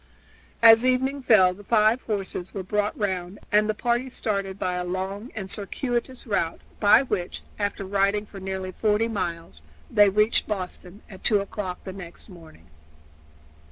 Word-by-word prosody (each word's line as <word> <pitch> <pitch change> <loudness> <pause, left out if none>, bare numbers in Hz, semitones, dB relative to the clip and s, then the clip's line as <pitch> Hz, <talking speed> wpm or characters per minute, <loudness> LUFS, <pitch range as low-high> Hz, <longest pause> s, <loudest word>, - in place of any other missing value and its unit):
As 225 0 +9
evening 260 +2 +1
fell 195 -7 +5
the 205 +3 -14
five 220 +3 +3
horses 195 -3 -4
were 195 - -3
brought 205 +2 -1
round, 190 -2 -2
and 210 +1 +4
the 215 - 0
party 240 +3 0
started 200 -5 -3
by 180 - -1
a 180 0 -2
long 190 +5 -4
and 195 -3 -5
circuitous 240 +6 -3
route, 185 -7 -1 0.2
by 210 +5 +6
which, 195 -8 -3 0.2
after 205 -1 -2
riding 200 +2 +1
for 200 -1 -11
nearly 190 -1 -4
forty 215 +3 +1
miles, 170 - -4 0.3
they 205 -1 +6
reached 210 +3 +2
Boston 190 -1 -6
at 190 -3 -13
two 210 -3 +4
o'clock 195 -2 -5
next 190 0 -9
morning. 160 - -15
205 Hz, 155 wpm, -25 LUFS, 185-220 Hz, 0.3 s, As